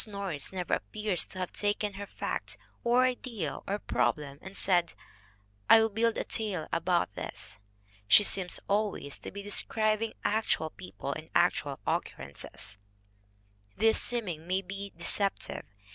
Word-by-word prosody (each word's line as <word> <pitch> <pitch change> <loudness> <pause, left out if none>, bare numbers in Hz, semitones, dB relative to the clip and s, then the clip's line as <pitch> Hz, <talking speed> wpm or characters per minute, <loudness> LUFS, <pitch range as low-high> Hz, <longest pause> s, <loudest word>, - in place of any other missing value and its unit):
Norris 195 -8 -2
never 180 -2 -2
appears 210 -4 +1
to - - -10
have 185 -1 -3
taken 205 0 0
her 200 +1 -6
fact - - -3 0.3
or 240 +2 +5
idea 235 - -2
or 200 - 0
problem 140 - 0
and 190 +1 -7
said, 175 -3 +2 0.7
"I 225 - +10
will 225 0 +3
build 230 +2 +2
a - - 0
tale 200 -8 -2
about 170 - +2
this." 95 - -5 0.5
She 205 - +8
seems 190 -3 +1
always 200 -8 0
to - - -7
be 200 0 -7
describing 215 +2 +1
actual 205 -7 +1
people 95 +1 -6
and - - -8
actual - - +2
occurrences. 70 +7 -3 1.0
This 220 +2 +4
seeming 180 -10 0
may 190 +2 +1
be 200 +1 -6
de 175 - -7
ceptive. 200 -1 0
195 Hz, 145 wpm, -30 LUFS, 170-215 Hz, 1.0 s, I